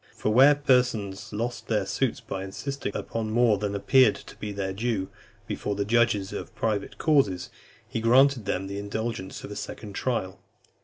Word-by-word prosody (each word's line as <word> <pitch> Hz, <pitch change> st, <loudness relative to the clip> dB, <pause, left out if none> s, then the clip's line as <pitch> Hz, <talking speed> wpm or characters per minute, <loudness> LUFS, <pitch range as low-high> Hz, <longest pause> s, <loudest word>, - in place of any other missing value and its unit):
For 105 Hz, -, 0 dB
where 135 Hz, +5 st, +7 dB
persons 125 Hz, -8 st, +1 dB
lost 115 Hz, +3 st, -3 dB
their -, -, +1 dB
suits -, -, -1 dB
by 95 Hz, 0 st, -5 dB
insisting 125 Hz, +4 st, -5 dB
upon 115 Hz, -1 st, -3 dB
more 115 Hz, -2 st, +3 dB
than 100 Hz, 0 st, -2 dB
appeared 125 Hz, +3 st, +5 dB
to -, -, -12 dB
be 105 Hz, -, -5 dB
their 95 Hz, -1 st, -3 dB
due, 105 Hz, -2 st, -1 dB, 0.4 s
before 105 Hz, -, -3 dB
the 100 Hz, 0 st, -1 dB
judges 110 Hz, -3 st, +2 dB
of 115 Hz, -, -7 dB
private 105 Hz, -2 st, -2 dB
causes, 105 Hz, -, +2 dB, 0.4 s
he 115 Hz, -, -3 dB
granted 130 Hz, 0 st, +4 dB
them 95 Hz, -, -1 dB
the 100 Hz, +1 st, -5 dB
indulgence 100 Hz, -1 st, -4 dB
of -, -, -8 dB
a -, -, -6 dB
second 105 Hz, 0 st, -7 dB
trial. 95 Hz, -6 st, -2 dB
110 Hz, 170 wpm, -26 LUFS, 100-120 Hz, 0.4 s, where